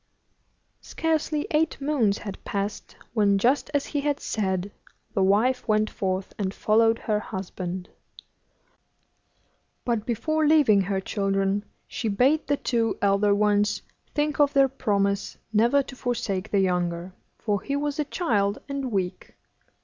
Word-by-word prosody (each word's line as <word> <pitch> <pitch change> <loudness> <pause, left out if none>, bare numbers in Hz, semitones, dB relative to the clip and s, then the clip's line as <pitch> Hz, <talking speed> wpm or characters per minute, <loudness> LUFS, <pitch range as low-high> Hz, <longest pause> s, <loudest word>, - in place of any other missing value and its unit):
Scarcely 315 -2 -1
eight 310 +1 +1
moons 275 -8 +1
had 200 -2 -8
passed 200 +1 -4 0.2
when, 205 -3 +3
just 250 +10 +2
as 285 -2 0
he 290 - -2
had 285 0 0
said, 190 -2 -2 0.4
the 195 - +1
wife 225 +8 +2
went 215 -1 +2
forth, 190 0 -2
and 195 -1 -2
followed 225 +1 +3
her 215 -3 -1
husband; 185 -2 -5 2.0
but 235 -3 0
before 310 +7 0
leaving 290 -10 +5
her 195 0 -1
children 195 0 0 0.2
she 230 - -4
bade 255 +9 +2
the 285 0 +1
two 230 -4 0
elder 200 0 +3
ones 210 0 +2 0.3
think 295 0 0
of 290 -1 +4
their 275 -1 +5
promise 200 -6 -1 0.2
never 235 +6 +4
to 270 - -10
forsake 230 -6 -2
the 200 - +2
younger, 180 -1 -1 0.2
for 205 -3 -1
he 280 - -3
was 290 +1 -2
a 300 - +1
child, 210 - 0
and 275 -3 -3
weak. 185 -2 -3
215 Hz, 140 wpm, -25 LUFS, 200-275 Hz, 2.0 s, leaving